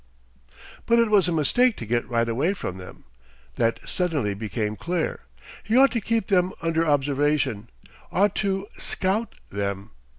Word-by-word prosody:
But 235 - +4
it 230 -2 +3
was 200 -4 +4
a - - 0
mistake 215 - +2
to 115 - -6
get 120 +2 -1
right 115 -1 +1
away 140 - 0
from 95 - -5
them. 90 - -11 0.5
That 115 -1 +1
suddenly 155 - 0
became 105 +1 -3
clear. 170 - -2 0.4
He 225 - +1
ought 275 +1 +6
to 230 - -1
keep 225 0 0
them 185 -1 +2
under 165 0 +1
observation, 145 -5 +1 0.4
ought 200 +1 +3
to 195 -1 0
"scout" 200 +5 -1 0.2
them. 100 -1 -3
160 Hz, 155 wpm, -24 LUFS, -, 0.5 s, ought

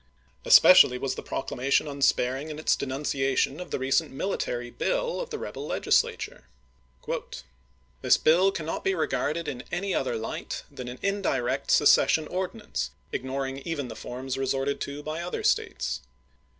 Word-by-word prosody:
Especially 125 - +8
was 135 +1 -2
the - - -6
proclamation 135 +3 -1
unsparing 140 0 +1
in 150 - -6
its 155 - +2
denunciation 135 +1 -1
of 180 - -7
the - - -2
recent 135 +4 +1
military 120 -7 -3
bill - - -1
of - - -6
the - - -4
rebel - - -6
Legislature. - - 0 1.6
This - - +5
bill 180 +5 +4
cannot 165 -4 -4
be 195 - +1
regarded 160 0 -1
in 125 -3 -4
any 195 +2 -1
other 135 - 0
light 110 0 -5
than 125 - -8
an 125 +1 -6
indirect 195 -11 -1
secession 155 - +5
ordinance, 185 - -3 0.2
ignoring 135 +1 -3
even 140 -3 -4
the - - -7
forms 130 +2 -5
resorted 135 +1 -1
to 145 +1 -5
by 155 +2 -4
other 175 +1 -4
States. 65 0 0
140 Hz, 145 wpm, -27 LUFS, 130-160 Hz, 1.6 s, Especially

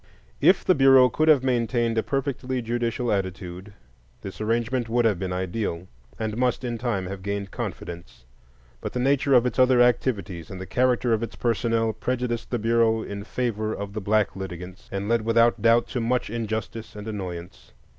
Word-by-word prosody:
If 180 +6 +4
the 185 - +5
Bureau 135 -3 +6
could 155 +6 0
have 145 -5 +6
maintained 120 -2 +1
a 110 - +2
perfectly 130 -1 -2
judicial 120 +1 -1
attitude, 95 -1 -4 0.5
this 95 +2 -8
arrangement 115 +2 0
would 120 +1 +2
have 105 -6 +2
been 95 -1 -3
ideal, 90 -1 -3 0.3
and 110 -1 -3
must 125 +1 0
in 120 -2 -3
time 110 -6 -1
have 95 +1 -6
gained 100 0 -4
confidence; 85 -7 -7 0.6
but - - -5
the 125 - -2
nature 140 +1 +3
of 125 0 +5
its 125 +1 -1
other 130 -1 +5
activities 105 - +1
and 95 - -7
the 95 - -6
character 125 +1 +2
of 110 - +1
its 115 - -5
personnel 115 -1 0
prejudiced 120 +1 -2
the 120 - 0
Bureau 115 0 +2
in 100 0 -6
favor 110 -1 -2
of 100 0 -6
the 110 - -4
black 105 0 +1
litigants, 90 -1 -8
and 100 +1 -3
led 115 0 +2
without 115 +1 +3
doubt 115 +1 +4
to 125 - -2
much 120 -1 0
injustice 110 -1 -4
and 105 +1 -8
annoyance. 90 -5 -7
115 Hz, 180 wpm, -25 LUFS, 100-125 Hz, 0.6 s, Bureau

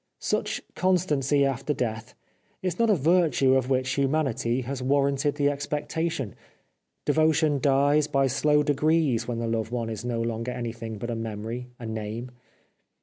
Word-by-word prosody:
Such - - -2
constancy 150 -7 +2
after 135 +2 -1
death 115 -1 -3 0.5
is 180 -2 -2
not 230 -1 +3
a 210 - +5
virtue 155 -4 +3
of 130 -1 +1
which 130 -1 +1
humanity 135 -3 0
has 130 +1 -4
warranted 140 +2 +1
the 145 -1 +2
expectation. 150 - -3 0.7
Devotion 155 -2 +3
dies 145 +2 +3
by 135 -2 +2
slow 150 +3 +2
degrees 145 -4 +2
when 120 -1 -2
the 115 - -2
loved 115 -1 -1
one 115 -2 -3
is 110 - -5
no 120 -1 -2
longer 115 +1 -2
anything 115 -2 -5
but 120 +3 -4
a - - -2
memory, 115 +2 -5
a 120 - -8
name. 110 +2 -5
135 Hz, 150 wpm, -26 LUFS, 115-150 Hz, 0.7 s, a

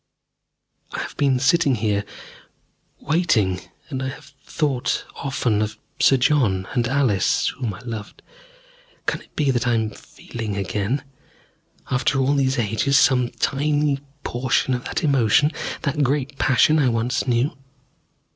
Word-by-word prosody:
I - - -3
have - - -7
been 135 -3 +2
sitting 140 +1 +3
here, 105 -2 0 1.0
waiting, 110 - +1 0.3
and 130 -1 -3
I 130 - -2
have 135 - -11
thought 140 -5 -1
often 125 -6 0
of 110 +1 -2 0.2
Sir 135 - +5
John 120 -9 +2
and 120 -2 +1
Alice, 125 -8 +2
whom 120 -7 -4
I - - -12
loved. 110 -4 -7 0.8
Can - - -1
it - - -21
be 145 -3 +2
that 120 -1 0
I 120 - +3
am 110 -1 0
feeling 110 0 -7
again, 105 +6 -1 0.9
after 130 +2 +1
all 135 +1 +2
these 135 -2 +1
ages, 120 +5 +2
some 125 -3 +4
tiny 145 +1 0 0.2
portion 130 +1 0
of 125 0 -3
that - - -3
emotion, 140 0 +3 0.3
that 145 0 0
great 140 0 0
passion 145 +4 +4
I 135 -4 +3
once 120 +3 -1
knew? 125 +3 +1
130 Hz, 140 wpm, -22 LUFS, 115-140 Hz, 1.0 s, Sir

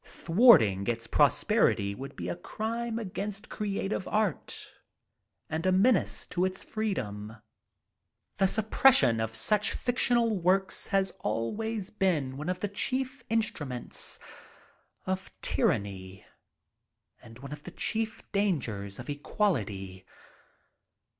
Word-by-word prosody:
Thwarting 165 - +5
its 115 -1 -1
prosperity 100 -3 +3
would 135 +6 -8
be 85 - -5
a 90 - -2
crime 230 +1 -3
against 205 -1 -4
creative 200 -2 -2
art 210 -7 -2 0.7
and 160 +1 -3
a - - +4
menace 195 +3 +3
to 175 - -1
its 185 0 -2
freedom. 110 - -3 1.0
The 195 - +4
suppression 220 - +4
of 110 0 -2
such 210 - +3
fictional 240 -4 +1
works 190 +2 +2
has 195 -1 +1
always 205 - -2
been 160 -10 0
one 150 +5 -4
of 180 0 -2
the 205 - 0
chief 260 +5 -2
instruments 150 - -2 0.9
of 190 +1 -3
tyranny 95 -3 -1 1.0
and 115 0 -13
one 140 +3 -8
of 150 - -9
the 180 - -8
chief 220 +4 -2
dangers 125 - -1
of 125 - -9
equality. 105 - -2
185 Hz, 115 wpm, -29 LUFS, -, 1.0 s, Thwarting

